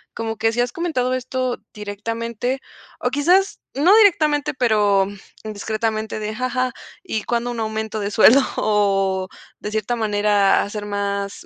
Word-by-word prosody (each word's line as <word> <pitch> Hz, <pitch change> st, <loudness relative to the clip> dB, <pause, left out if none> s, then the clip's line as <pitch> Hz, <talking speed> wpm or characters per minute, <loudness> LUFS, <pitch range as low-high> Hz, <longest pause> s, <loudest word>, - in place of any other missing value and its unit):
Como 225 Hz, -1 st, -4 dB
que, 225 Hz, 0 st, +1 dB
¿sí 240 Hz, -, +1 dB
has 245 Hz, 0 st, -1 dB
comentado 260 Hz, -7 st, -1 dB
esto 255 Hz, 0 st, -2 dB, 0.2 s
directamente? 230 Hz, +5 st, -4 dB, 0.4 s
O 250 Hz, -, +1 dB
quizás, 350 Hz, +9 st, +2 dB
no 330 Hz, +9 st, +4 dB
directamente, 310 Hz, -9 st, +3 dB
pero, 210 Hz, -6 st, +3 dB
mm, 205 Hz, -, -9 dB, 0.3 s
indiscretamente 215 Hz, +1 st, -3 dB
de: 215 Hz, 0 st, -4 dB
"Ja 255 Hz, +3 st, -2 dB
ja, 255 Hz, 0 st, 0 dB, 0.3 s
¿y 215 Hz, -1 st, -3 dB
cuándo 240 Hz, 0 st, -1 dB
un 235 Hz, -, -5 dB
aumento 220 Hz, 0 st, -3 dB
de 200 Hz, 0 st, -2 dB
sueldo?". 225 Hz, +5 st, +7 dB, 0.2 s
O 195 Hz, -3 st, +1 dB, 0.3 s
de 210 Hz, -, -5 dB
cierta 220 Hz, +2 st, -1 dB
manera, 205 Hz, -2 st, +2 dB
hacer 205 Hz, +1 st, -6 dB
más 200 Hz, -1 st, -3 dB
220 Hz, 150 wpm, -21 LUFS, 205-255 Hz, 0.4 s, sueldo